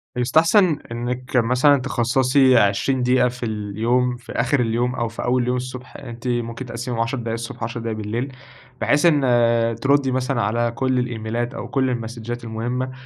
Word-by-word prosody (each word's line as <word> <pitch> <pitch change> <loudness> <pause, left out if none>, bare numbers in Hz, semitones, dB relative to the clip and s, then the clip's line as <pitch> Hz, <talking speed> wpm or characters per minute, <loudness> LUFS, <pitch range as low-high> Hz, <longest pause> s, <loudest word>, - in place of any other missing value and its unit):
يستحسن 160 - +3
إنِِّك 125 +2 -3
مثلًا 125 +4 +4
تخصّصي 130 +1 +3
20 115 +5 +2
دقيقة 125 0 +3
في 125 0 -5
اليوم، 110 +4 0
في 125 - -12
آخِر 130 +3 +1
اليوم 120 +1 0
أو 120 - -1
في 115 - -6
أول 125 +1 +2
اليوم 125 +1 0
الصبح، 130 0 -7
أنتِ 120 -2 -8
ممكن 120 +1 -2
تقسِّميهم 120 0 -5
10 130 +4 -1
دقايق 115 -2 -3
الصبح، 115 0 -6
10 115 +1 -4
دقايق 115 -1 -4
بالليل، 115 +6 -3 0.5
بحيث 140 +9 +2
إن 120 -6 +3
ترُدّي 140 -1 +2
مثلًا 130 -1 0
على 115 +3 0
كل 130 0 +1
الإيميلات 120 0 -3
أو - - -6
كل 130 -2 0
المسدجات 120 0 -5
المُهمَّة، 120 +3 -3
120 Hz, 165 wpm, -21 LUFS, 115-130 Hz, 0.5 s, مثلًا